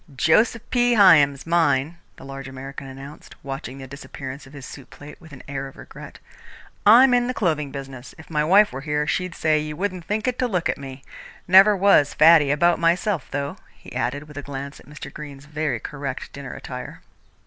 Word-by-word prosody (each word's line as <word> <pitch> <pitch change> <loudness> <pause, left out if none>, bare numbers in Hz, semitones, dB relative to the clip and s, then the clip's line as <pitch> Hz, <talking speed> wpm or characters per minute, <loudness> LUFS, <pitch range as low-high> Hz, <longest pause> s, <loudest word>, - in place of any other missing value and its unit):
"Joseph 215 - +2
P. 245 -1 +3
Hyam's 150 -9 +5
mine," 165 -2 +1 0.2
the - - -13
large 135 0 -8
American 135 +1 -9
announced, 135 +2 -11
watching 135 -1 -7
the 135 - -9
disappearance 135 0 -9
of 135 - -17
his 140 -2 -10
soup 135 -1 -11
plate 145 +3 -13
with 160 -2 -15
an 130 - -12
air 135 0 -5
of 135 - -15
regret. - - -12 0.7
"I'm 245 +4 +7
in 245 0 +2
the 255 - -3
clothing 155 -7 -1
business. 135 -2 -9
If 160 - -14
my 150 -2 -1
wife 200 +7 +5
were 135 - -6
here, 150 0 -1
she'd 180 +3 -2
say 155 -1 +1
you 150 0 -5
wouldn't 185 0 -3
think 215 +3 -2
it 250 -1 -2
to 255 - +1
look 180 -7 -1
at - - -2
me. 135 -1 -9 0.4
Never 195 +3 +7
was 185 -7 +4
faddy 155 -2 +6
about 170 +4 +2
myself, 170 0 0
though," 140 0 -4 0.2
he - - -14
added, 145 +4 -3
with 150 -1 -13
a - - -4
glance 140 0 -7
at - - -18
Mr. 145 -2 -10
Greene's 145 -2 -10
very 150 -5 -3
correct 140 +1 -6
dinner 140 -2 -8
attire. 125 -1 -8
150 Hz, 200 wpm, -22 LUFS, 135-175 Hz, 0.7 s, I'm